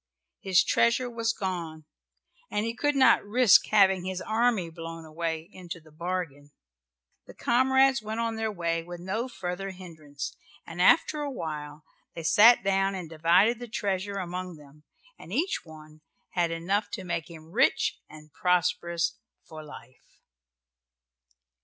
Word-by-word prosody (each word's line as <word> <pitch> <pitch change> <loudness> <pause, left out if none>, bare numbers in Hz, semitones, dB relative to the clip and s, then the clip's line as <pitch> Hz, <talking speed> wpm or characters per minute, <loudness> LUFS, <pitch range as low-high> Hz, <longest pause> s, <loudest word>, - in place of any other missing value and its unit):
His 190 -2 +3
treasure 240 +1 +2
was 230 -1 0
gone 170 -7 -5 0.6
and 210 - -1
he 230 - -2
could 290 +4 0
not 265 -1 +5
risk 215 -1 +5
having 190 -3 +4
his 185 0 -4
army 220 -5 0
blown 165 0 -8
away, 160 0 -4
into 175 -2 -8
the 155 -1 -20
bargain. 160 -3 -5 0.8
The - - -13
comrades 265 +1 +3
went 215 +1 -5
on 230 -1 -1
their 220 0 -2
way 170 -3 -1
with 175 +1 -9
no 195 +8 -3
further 190 -3 -5
hindrance, 160 -7 -8 0.3
and 170 +1 -5
after 300 - +4
awhile 155 - -5 0.3
they 165 - -6
sat 230 +7 +6
down 195 0 +1
and 175 -4 -7
divided 180 +9 +3
the 245 - -7
treasure 200 -2 -2
among 180 -1 -5
them 150 0 -18 0.3
and - - -12
each 360 +5 0
one 155 -1 -14 0.3
had 175 -2 +1
enough 195 +5 -1
to 190 - -4
make 170 -2 -4
him 160 -1 -13
rich 225 - +2
and 155 0 -14
prosperous 175 -1 0 0.3
for 155 -1 -9
life. 130 -4 -15
180 Hz, 145 wpm, -27 LUFS, 165-215 Hz, 0.8 s, sat